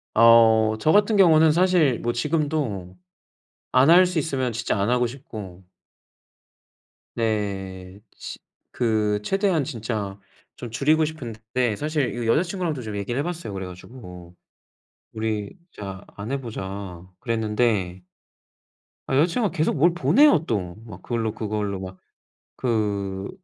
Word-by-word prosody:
어 110 -1 +6
저 155 - +2
같은 210 +3 +4
경우는 160 -4 +6
사실 170 -6 +3
뭐 120 - -1
지금도 140 - -2 0.8
안 130 +3 +5
할 180 +2 +8
수 180 -2 -2
있으면 135 -5 -1
진짜 115 -1 -2
안 100 +4 0
하고 125 0 +2
싶고 110 - -9 1.5
네 100 -4 -3 0.2
시 - - -8 0.3
그 110 -3 0
최대한 195 - +1
진짜 110 -7 -4 0.4
좀 120 - -8
줄이고 150 +7 +2
싶은데 120 -5 -3
사실 150 +1 -1
이거 120 -1 -3
여자 150 +9 +3
친구랑도 175 -7 -3
좀 110 -2 -6
얘기를 100 +5 -3
해 - - 0
봤어요 170 -9 -5
그래 95 -1 -5
가지고. 90 -2 -11 0.8
"우리 110 - -3 0.2
진짜 100 -1 -8
안 105 +5 -6
해 140 0 -2
보자." 95 -6 -6 0.2
그랬는데 105 -5 0 1.0
아 135 - 0
여자 150 +4 +5
친구가 215 -6 0
계속 155 0 +1
뭘 170 +4 +4
보내요 255 - +4
또. 90 -6 -2
막 95 -5 -11
그걸로, 115 -2 -2
그걸로 105 -3 -3
막 95 0 -8 0.6
그 100 -5 -1
115 Hz, 250 characters per minute, -24 LUFS, 100-150 Hz, 1.5 s, 할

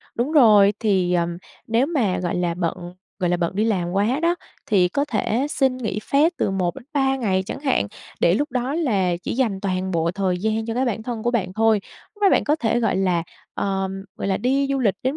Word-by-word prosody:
Đúng 250 +6 -1
rồi, 210 -9 +6
thì, 190 -5 +1
ờm, 170 -1 0 0.3
nếu 230 +4 +2
mà, 255 - 0
gọi 175 -1 -2
là, 175 -1 0
bận, 175 0 -4 0.2
gọi 180 -3 0
là, 175 - +2
bận 175 +2 -2
đi 215 - +2
làm 185 -6 0
quá 215 +9 +1
đó, 340 +1 +3 0.3
thì 190 -5 +3
có 280 +10 0
thể 245 0 -1
xin 265 -3 +1
nghỉ 225 -4 -3
phép 295 +9 +2
từ - - +1
1-3 265 - -1
ngày 195 -7 0
chẳng 250 - -5
hạn, 265 - +1 0.3
để 170 - +4
lúc 290 +8 -1
đó 255 +2 -2
là 200 - +1
chỉ - - -3
dành 225 -6 0
toàn 190 -1 -2
bộ 165 -1 +1
thời 185 -1 -1
gian 220 +3 -1
cho 225 - -3
cái 255 +2 +1
bản 225 -3 -2
thân 230 -1 -5
của 240 - +1
bạn 195 -7 -1
thôi. 220 0 +3 0.3
Lúc 415 - -15
đó 400 - +6
bạn - - +3
có 300 +1 +2
thể, 235 -4 0
gọi 225 -4 +1
là, 180 -3 +1 0.3
ờm, 195 0 -2
gọi - - -3
là, 190 - +1
đi 270 +5 +1
du 275 - +1
lịch 220 -7 +2
đến 265 +4 -1
215 Hz, 230 wpm, -22 LUFS, 185-255 Hz, 0.3 s, rồi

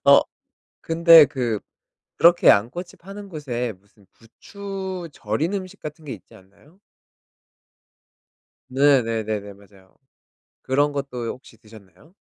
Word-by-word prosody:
어 140 0 +8 0.6
근데 165 -1 +7
그 120 -6 -2 0.6
그렇게 175 +1 +5
양꼬치 125 - +2
파는 195 +2 -11
곳에 125 - -4
무슨 100 0 -27
부추 190 - -8
절인 115 - -2
음식 195 0 -6
같은 155 +1 -9
게 135 - -5
있지 95 -6 -15
않나요? 100 - -22 1.9
네네네네, 115 -7 +1
맞아요. 100 -1 -22 0.7
그런 145 +3 +1
것도 135 -4 -5
요 - - -2
혹시 125 -2 -12
드셨나요? 110 - -19
135 Hz, 235 characters per minute, -22 LUFS, 110-170 Hz, 1.9 s, 어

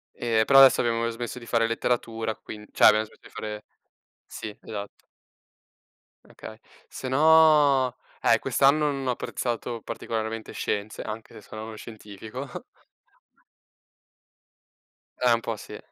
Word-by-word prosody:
E 115 -2 +1
però 135 -1 +7
adesso 135 -1 +7
abbiamo 115 -1 0
smesso 120 +2 -6
di 120 - -12
fare 115 -1 +1
letteratura 115 -1 -2
quind 105 -1 -11
cioè, - - +4
abbiamo 110 +1 +6
smesso - - -21
di - - -15
fare 105 0 -7 0.6
Sì 105 -1 -8
esatto. 100 -2 -8 1.2
Okay, 110 0 -11 0.3
se 130 - -7
no, 150 -3 +5 0.3
eh, - - +4
quest'anno 145 +2 +3
non 135 -2 -4
ho - - +2
apprezzato 120 -1 -4
particolarmente 110 0 -5
scienze, 105 +1 -3
anche 110 +1 -7
se - - -12
sono 110 +2 -9
a - - -6
uno 110 0 -8
scientifico. 110 +5 -9 2.6
Eh 125 -2 +5
un 115 - 0
po' 115 -1 -3
sì. - - -9
115 Hz, 135 wpm, -26 LUFS, 110-130 Hz, 2.6 s, però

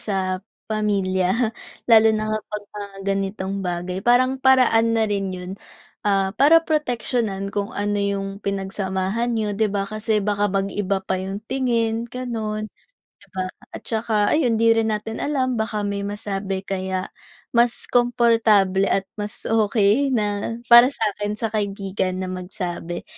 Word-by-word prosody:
sa 190 -2 -2 0.3
pamilya 205 +1 +1 0.3
lalo 225 -2 +6
na 215 0 -2
kapag 210 -1 -4
mga 200 -1 -8 0.2
ganitong 195 0 -3
bagay. 180 0 -3
Parang 255 +4 +3
paraan 235 -4 +4
na 225 - +3
rin 200 -2 -1
yun, 180 0 -7 0.5
ah, 195 -2 +1
para 315 +8 +5
proteksiyonan 235 -9 -1
kung 205 +2 -3
ano 205 0 0
yung 200 0 -2
pinagsamahan 195 +3 -2
niyo 215 -1 -1
'di 215 +1 +1
ba? 195 0 -1
Kasi 215 0 -1
baka 205 0 +1
mag-iba 195 0 -1
pa 190 -1 -1
yung 195 +3 -5
tingin, 235 -2 0
ganon, 220 -4 -4 0.5
'di - - -21
ba? 185 -1 -2 0.2
At - - -7
tsaka 220 -2 0
ayun 245 -7 +2
di 230 +1 +4
rin 225 -1 +2
natin 220 +1 -5
alam 260 -4 0
baka 220 -1 -1
may 200 0 -2
masabi 195 -2 -4
kaya 190 -1 -3 0.4
mas 235 0 +2
komportable 225 -5 +3
at 195 - +1 0.2
mas 205 0 -6
okey 220 +3 +2
na 210 -2 -1 0.2
para 240 +1 +10
sa'kin 210 -5 -2
sa 225 0 -3
kaibigan 195 -3 -2
na 185 - -3
magsabi. 180 -2 -5
210 Hz, 140 wpm, -22 LUFS, 195-225 Hz, 0.5 s, para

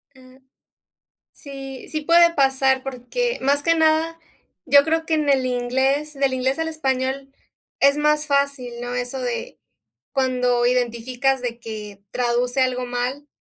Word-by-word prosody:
Mm. 255 0 -18 0.9
Sí, 270 -2 -9
sí, 310 - -3
puede 340 +2 +5
pasar, 265 -2 +2
porque 270 - -3
más 280 +2 +2
que 330 +3 +2
nada, 320 +1 +2 0.5
yo 280 0 +6
creo 320 +1 0
que 325 - -2
en 305 -2 +1
el 265 -2 +3
inglés, 265 +4 0
del 275 -1 +1
inglés 260 +1 0
al 325 0 -2
español 270 -3 -2 0.5
es 280 0 +5
más 300 0 +2
fácil, 280 -4 0
¿no? 245 0 -4
Eso 250 +2 -3
de 240 -2 -4 0.5
cuando 250 -2 +1
identificas 250 +2 0
de 240 -1 -4
que 210 -3 -8
traduce 245 +1 0
algo 255 -1 0
mal, 245 +4 -3
265 Hz, 145 wpm, -22 LUFS, 250-290 Hz, 0.9 s, yo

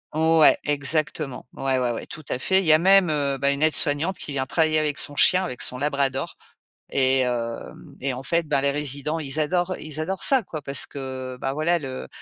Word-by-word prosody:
ouais, 160 0 +5
exactement. 145 -1 -2
Ouais, 135 -1 -1
ouais, 125 -1 0
ouais, 115 - -5
tout 155 - -9
à 125 - -2
fait. 190 +6 +2
Il 190 - -2
y 155 - +5
a 155 - +5
même, 190 -1 +5
heu, 140 -2 -1
bah 140 +1 +1
une 140 - -3
aide 155 0 +3
soignante 150 +6 +1
qui 145 - -6
vient 135 -1 -2
travailler 155 0 +2
avec 150 -2 -1
son 145 - +1
chien, 185 +5 +6
avec 125 -10 -5
son 125 - +1
labrador 140 -1 -2 0.6
et 130 -1 +2
heu, 115 -2 -4 0.3
et 135 0 -2
en 125 - -6
fait, 170 +3 -1
bah 145 -2 +1
les 140 - +2
résidents, 145 +2 -2
ils 145 0 -4
adorent, 180 +4 0
ils 155 0 -6
adorent 190 +5 -3
ça, 265 -5 +5
quoi. 155 -5 -7
Parce 140 0 -2
que 130 -2 -7
bah 135 0 -2
voilà 170 +3 0
le, 130 -3 -7
145 Hz, 220 wpm, -23 LUFS, 135-160 Hz, 0.6 s, chien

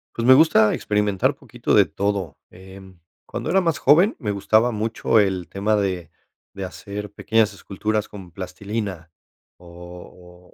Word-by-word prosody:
Pues, 115 +1 -2
me 130 - +9
gusta 145 -8 +4
experimentar 105 -2 0
poquito - - -4
de - - +6
todo, 100 -6 -3
em, 95 0 -14 0.3
cuando - - -5
era 190 +2 +3
más 165 -4 -1
joven, 170 - +4
me 115 -8 -4
gustaba 110 +4 +2
mucho 110 +1 0
el 95 -4 0
tema 105 +2 0
de 95 -5 -2 0.4
de 95 -1 -5
hacer 100 +2 -8
pequeñas 110 +1 +1
esculturas 105 +2 -3
con 95 -4 -11
plastilina, 95 -1 -6 0.5
o 90 0 -14
100 Hz, 140 wpm, -22 LUFS, 95-110 Hz, 0.5 s, me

